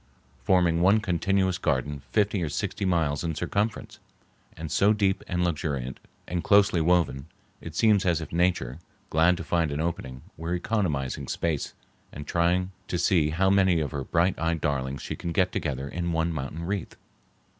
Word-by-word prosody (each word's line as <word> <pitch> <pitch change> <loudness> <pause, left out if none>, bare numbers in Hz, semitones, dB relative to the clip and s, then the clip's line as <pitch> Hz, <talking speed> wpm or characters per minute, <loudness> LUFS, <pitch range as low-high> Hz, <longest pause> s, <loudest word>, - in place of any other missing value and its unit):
forming 85 -3 +3
one 100 +4 +5
continuous 95 -1 0
garden 70 -2 -1
fifty 105 -2 +1
or 80 - -1
sixty 85 +6 -3
miles 80 -5 +1
in 80 -2 -2
circumference, 110 +3 -2 0.6
and 80 -1 -6
so 105 +2 +4
deep 100 -3 0
and 90 -1 0
luxuriant 75 -6 -2 0.3
and 90 0 -2
closely 100 -4 +4
woven 80 -5 +1 0.3
it 80 -2 -8
seems 105 -2 +4
as 85 -4 +2
if 80 - -7
Nature, 85 -7 0 0.3
glad 85 +3 +4
to 95 - -5
find 85 -2 +1
an 70 - -3
opening, 65 -6 -4
were 85 +2 -2
economizing 85 - -1
space 80 -4 -2 0.4
and 75 - -8
trying 90 +3 +1 0.2
to 90 - -2
see 85 -4 +3
how 95 +5 +2
may 95 -3 +4
of 75 -2 -2
her 70 -3 -3
bright 85 +6 +1
eyed 80 0 0
darlings 65 -2 -2
she - - -4
can 85 - -5
get 90 +1 +2
together 70 -3 -3
in 85 +3 -3
one 80 0 0
mountain 75 +2 -5
wreath. 95 +1 -3
85 Hz, 170 wpm, -26 LUFS, 75-95 Hz, 0.6 s, one